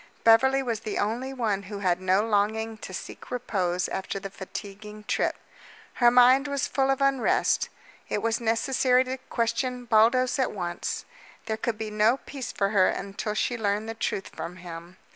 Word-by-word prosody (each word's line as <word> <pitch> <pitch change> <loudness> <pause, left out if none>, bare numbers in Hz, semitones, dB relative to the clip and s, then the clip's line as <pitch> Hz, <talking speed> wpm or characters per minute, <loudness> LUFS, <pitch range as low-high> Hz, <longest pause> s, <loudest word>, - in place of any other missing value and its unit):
Beverly 265 +4 +5
was 230 -4 -2
the 215 - -4
only 235 +6 -1
one 220 -7 -1
who 200 +1 -7
had 185 -2 0
no 185 +2 +3
longing 220 +1 0
to 195 - -8
seek 180 - -8
repose 185 -8 -1
after 190 +1 -4
the 195 0 -7
fatiguing 210 +2 -8
trip. - - 0 0.6
Her 240 -1 +5
mind 250 +3 +6
was 280 -1 -1
full 270 0 0
of 270 0 +1
unrest. 275 -2 +2 0.4
It 205 - -1
was 230 +1 0
necessary 250 +3 +2
to 260 0 -5
question 245 +2 -1
Baldos 240 +4 +3
at 260 - +1
once. 175 -4 -4 0.4
There 220 - -1
could 220 0 -2
be 215 -1 -4
no 215 +4 +3
peace 275 -2 -7
for 200 -1 0
her 195 -3 +4
until 200 +2 -3
she 240 +2 -1
learned 210 0 0
the 225 - -3
truth 200 -3 -3
from 175 - -7
him. 175 0 -10
220 Hz, 175 wpm, -26 LUFS, 200-250 Hz, 0.6 s, mind